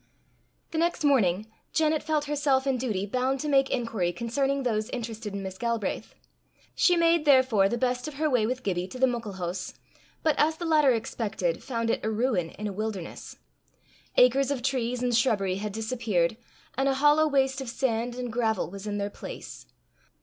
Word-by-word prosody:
The 320 - -1
next 340 -1 0
morning, 215 -9 +3 0.3
Janet 310 -1 +2
felt 305 -1 0
herself 285 -2 +1
in 270 -2 +1
duty 210 -6 -1
bound 255 +5 0
to 305 - -3
make 275 -2 +3
inquiry 225 -8 -1
concerning 270 +8 -1
those 215 -3 -1
interested 225 -4 -5
in 200 - -4
Miss 190 0 -7
Galbraith. 230 -4 -2 0.6
She 355 - +4
made, 335 -1 +3
therefore, 260 -9 +4
the 240 - -1
best 250 +2 -1
of 305 - -7
her 310 +2 0
way 245 -7 +2
with 255 +1 -3
Gibbie 180 -2 -1
to 195 - -9
the 260 - +4
Muckle 235 -5 -3
Hoose, 180 0 -4 0.5
but, 315 - +4
as 315 +1 +3
the 345 - -5
latter 305 -4 +4
expected, 215 -6 -2
found 230 -3 -1
it - - -2
a 220 - 0
ruin 220 -6 0
in 210 - -8
a 205 - -3
wilderness. 210 -4 -5 0.8
Acres 260 +2 +5
of 270 -4 -2
trees 250 -2 -1
and 245 -1 +1
shrubbery 200 -6 +2
had 210 +1 -4
disappeared, 220 -5 0 0.4
and 270 +1 +1
a 270 - +1
hollow 295 +3 +4
waste 270 -2 +1
of 260 - -5
sand 240 -1 -1
and 245 -2 -5
gravel 225 -6 0
was 200 +1 -8
in 205 0 -2
their 200 0 -2
place. - - -9
245 Hz, 185 wpm, -27 LUFS, 210-275 Hz, 0.8 s, Acres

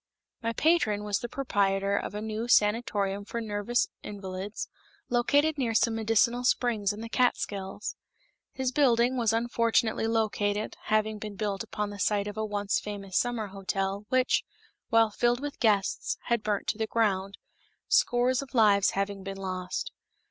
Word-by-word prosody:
My 230 0 -1
patron 230 -10 +2
was 205 -1 0
the 240 - -5
proprietor 200 -6 0
of 205 - -3
a 210 - -4
new 220 +1 -3
sanatorium 210 -3 +2
for 235 +3 -5
nervous 220 +2 0
invalids, 195 0 -6 0.4
located 285 +5 +2
near 230 -4 0
some 225 +1 +3
medicinal 225 +2 +2
springs 230 -5 +1
in 205 +1 -7
the 230 - -5
Catskills. 205 -5 -1 0.6
His 260 -1 -2
building 250 -3 +3
was 230 -4 +2
unfortunately 230 -1 +1
located, 215 -2 0
having 215 0 +1
been 210 -1 -6
built 200 -1 -2
upon 210 -2 -3
the 205 - -9
site 205 0 +1
of 205 - -5
a 220 - -2
once 205 -1 0
famous 200 -3 -7
summer 235 -4 0
hotel, 195 +1 -3
which, 255 0 +2 0.5
while 225 -1 +4
filled 240 +3 +1
with 290 +1 -6
guests, 205 -5 +1
had 235 -2 0
burnt 210 -2 -1
to 210 - -2
the 220 - 0
ground, 200 -4 0 0.5
scores 245 +1 +3
of 275 -1 -10
lives 200 -4 +5
having 200 0 -1
been 195 0 -6
lost. 185 - -4
215 Hz, 155 wpm, -28 LUFS, 200-235 Hz, 0.6 s, lives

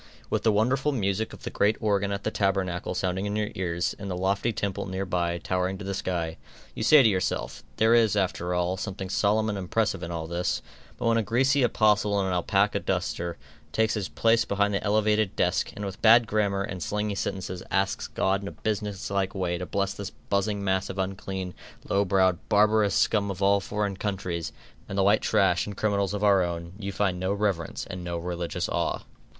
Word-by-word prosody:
With - - +1
the 110 - +3
wonderful 130 +7 +2
music 110 -3 -1
of - - -12
the - - -4
great 105 +2 +2
organ 100 -2 +1
at 100 0 -3
the 110 - -1
tabernacle 95 -3 -1
sounding 95 +2 -1
in 100 - -2
your 105 0 -1
ears, 85 -1 -1
and 100 -1 -5
the 90 - -3
lofty 100 +5 +1
temple 100 -2 -3
near 95 +1 -3
by 85 -2 -1
towering 90 +2 -1
to 100 - -8
the 100 - -2
sky, 85 -4 -2 0.4
you - - -6
say 140 +5 +7
to - - +6
yourself, 95 -4 -1 0.2
there 110 +1 +4
is, 115 -3 +4
after 90 -2 0
all, 90 +1 0
something 95 -1 -5
solemn 110 +2 +2
and 105 -2 -2
impressive 95 0 0
in 85 - -5
all 85 -2 -4
this; 85 +2 -2 0.3
but 125 - -4
when 115 0 +3
a - - +2
greasy 130 +6 +2
apostle 105 -4 +3
in 95 - +1
an 95 - -1
alapaca 90 -1 +2
duster, 85 0 -2 0.3
takes 110 0 +1
his 105 -3 -2
place 115 0 +3
behind 100 0 0
the 100 - -1
elevated 105 -1 +2
desk, - - +1
and 105 - -5
with 95 0 -6
bad 115 +1 +7
grammar 100 -2 0
and 95 -2 -5
slangy 105 +4 -1
sentences, 95 -2 -4
asks 95 0 0
God 95 +1 0
in 100 - -6
a - - -5
businesslike 100 -2 -2
way 90 -2 -1
to 90 - -5
bless 100 +3 -1
this 100 -1 -6
buzzing 100 -1 -2
mass 95 -1 0
of 95 - -6
unclean, 95 -1 -3 0.3
low 100 +1 +2
browed, 95 -2 +3
barbarous 105 0 +4
scum 100 -2 +2
of 100 0 -3
all 100 +1 +4
foreign 100 0 -2
countries, 90 -5 -3 0.4
and 100 - -4
the 95 - +3
white 100 +2 +4
trash - - +2
and 100 -1 -7
criminals 100 -2 0
of 105 - -3
our 100 -2 +5
own, 85 0 -3
you 100 -2 -4
find 95 -3 0
no 95 +1 -1
reverence, 100 -5 -1
and 90 -2 -6
no 85 -1 -3
religious 85 0 -3
awe. - - -1
100 Hz, 205 wpm, -27 LUFS, 95-105 Hz, 0.4 s, say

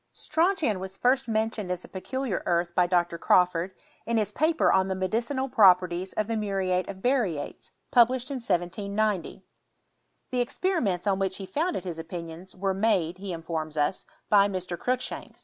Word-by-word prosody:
Strontian 325 - +1
was 190 +1 -7
first 255 +1 +2
mentioned 220 -3 -1
as 180 0 -3
a - - -12
peculiar 250 +3 -3
earth 170 0 +1
by 180 0 +3
Dr. 175 -1 +1
Crawford, 180 +1 +2 0.3
in 235 0 +1
his 210 -2 0
paper 315 +8 +2
on 190 0 +3
the 190 - -1
medicinal 230 +8 -1
pro 200 -7 +7
perties 180 +1 -5
of 215 - 0
the 225 +2 -2
muriate 195 -3 -1
of 190 -1 -8
barytes, 215 - -1 0.2
published 250 +2 +4
in 275 - -2
1798; 200 -1 -1 0.9
The 250 -1 +1
experiments 240 - 0
on 195 -1 +1
which 190 -1 -1
he 195 - -6
founded 320 - -1
hia 180 -2 -4
opinioni 170 +1 -8
were 195 +1 0
made, 190 -4 +1
he 195 -1 -5
informs 160 -2 -4
ns, 150 +5 0 0.2
by 200 -1 +5
Mr. 185 -3 -4
Cruikshanks. 250 +8 -3
195 Hz, 165 wpm, -27 LUFS, 180-235 Hz, 0.9 s, pro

